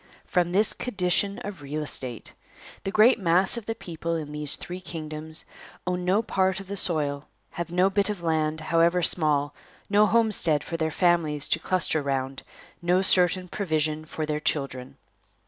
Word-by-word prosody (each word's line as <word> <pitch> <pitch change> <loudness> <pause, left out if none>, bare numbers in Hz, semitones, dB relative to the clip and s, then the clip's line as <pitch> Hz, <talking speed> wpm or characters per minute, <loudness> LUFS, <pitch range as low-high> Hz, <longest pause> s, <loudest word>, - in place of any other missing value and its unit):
From 175 -2 +1
this 205 +4 +3
condition 200 -2 0
of 195 -5 -7
real 150 +2 -4
estate. 125 -6 -5 0.5
The - - 0
great 225 +4 +5
mass 185 +2 +3
of 235 -3 -6
the 225 - -2
people 170 -2 -4
in 155 -2 -4
these 150 -1 -2
three 180 +1 -7
kingdoms 155 -2 -6 0.4
own 180 0 -1
no 190 +5 +2
part 190 -4 +1
of 195 - -8
the 200 +2 -5
soil, 150 -6 +1 0.2
have 170 0 -4
no 180 +2 +3
bit 200 +1 +1
of 200 -5 -4
land, 155 -1 0
however 170 +2 +2
small, 150 -4 +2 0.4
no 210 +1 +5
homestead 210 -9 +2
for 170 - -5
their 160 -1 0
families 160 -4 +1
to - - +2
cluster 175 -4 0
round, 135 -1 -2 0.4
no 180 +2 +2
certain 180 -1 +3
provision 155 -5 -1
for 155 0 -4
their 150 0 -2
children. 135 -4 -3
170 Hz, 165 wpm, -26 LUFS, 155-190 Hz, 0.5 s, great